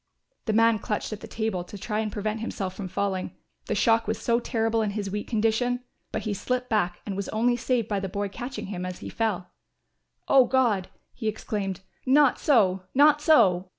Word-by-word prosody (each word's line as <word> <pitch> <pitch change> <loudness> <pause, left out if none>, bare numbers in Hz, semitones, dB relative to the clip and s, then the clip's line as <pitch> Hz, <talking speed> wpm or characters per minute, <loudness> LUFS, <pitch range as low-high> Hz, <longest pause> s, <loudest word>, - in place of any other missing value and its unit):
The 220 - 0
man 230 0 +4
clutched 210 +1 -3
at 210 - -6
the - - -9
table 220 -5 -2
to 205 - -10
try 210 +2 -2
and 215 -1 -1
prevent 215 +1 -2
himself 195 -4 -4
from 190 0 -6
falling; 190 0 -2 0.3
the - - 0
shock 230 -2 +3
was 220 - 0
so 235 0 +2
terrible 225 -2 0
in 215 - 0
his 200 -2 -3
weak 210 +1 -3
condition; 230 +2 +1 0.3
but 220 - -3
he 210 - -1
slipped 250 +5 -2
back 180 -5 0
and 200 - -4
was 200 0 -3
only 240 +3 +2
saved 240 -2 0
by 205 -2 -1
the 195 0 -4
boy 205 +1 -2
catching 245 +6 -6
him 180 -1 -4
as 185 0 -4
he - - -8
fell. 215 -6 -2 0.8
"O 265 -2 +6
God," 235 -8 +2 0.2
he 225 - -5
exclaimed, 205 -3 -3 0.3
"not 280 0 +5
so, 195 -10 +3
not 295 +2 +6
so." 190 - +4
220 Hz, 200 wpm, -26 LUFS, 195-235 Hz, 0.8 s, O